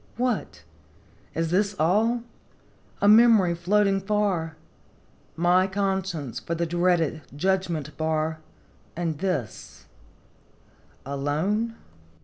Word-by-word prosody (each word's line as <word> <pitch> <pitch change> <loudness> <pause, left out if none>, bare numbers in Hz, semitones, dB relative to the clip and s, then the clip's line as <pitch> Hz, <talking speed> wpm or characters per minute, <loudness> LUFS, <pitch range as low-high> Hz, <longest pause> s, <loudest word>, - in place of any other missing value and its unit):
What! 235 - -2 0.7
is 165 0 -1
this 200 +2 +1
all? 220 +9 +2 0.8
A 200 - +3
memory 215 -4 +6
floating 195 +3 +1
far; 195 -6 -1 0.8
My 180 +2 +3
conscience 190 - -2
for 170 +7 -4
the 170 +1 -1
dreaded 170 -2 +1
judgment 170 -3 -1
bar; 160 0 -1 0.6
And 165 -3 -3
this 175 - -4 1.2
alone?" 155 - -1
175 Hz, 90 wpm, -25 LUFS, 160-200 Hz, 1.2 s, memory